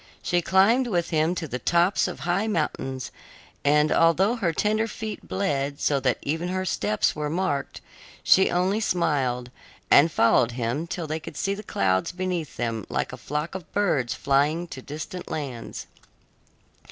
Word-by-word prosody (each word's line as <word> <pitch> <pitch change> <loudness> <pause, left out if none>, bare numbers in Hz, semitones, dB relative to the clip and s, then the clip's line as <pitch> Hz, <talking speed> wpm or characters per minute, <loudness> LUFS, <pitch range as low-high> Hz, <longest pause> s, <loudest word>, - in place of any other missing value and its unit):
She 175 0 +1
climbed 210 +9 +4
with 175 -6 -1
him 160 +2 +2
to 170 -2 -4
the 125 -2 -4
tops 175 +7 +2
of 180 - -7
high 180 +5 0
mountains, 135 - -2 0.5
and 150 +1 +3
although 180 +7 +4
her 195 -8 0
tender 215 +6 +1
feet 220 -1 -6
bled 145 -7 -1
so 140 -2 +1
that 130 -3 +1
even 160 +4 -2
her 185 +1 -2
steps 105 - 0
were 150 -1 -2
marked, 155 -4 -2 0.4
she 190 - +5
only 185 +4 +1
smiled, 140 - 0 0.4
and 160 +4 +7
followed 115 -2 +3
him 125 +7 -2
till 170 0 -4
they 155 +1 -3
could - - -10
see 195 - 0
the 200 - -6
clouds 95 - 0
beneath 180 -4 -3
them 115 -3 -2
like - - -2
a - - -3
flock 150 +3 -4
of 185 -3 -8
birds 150 -12 +1
flying 145 +5 +1
to 130 - -8
distant 155 +6 -7
lands. 130 -6 -5
160 Hz, 165 wpm, -25 LUFS, 140-185 Hz, 0.5 s, and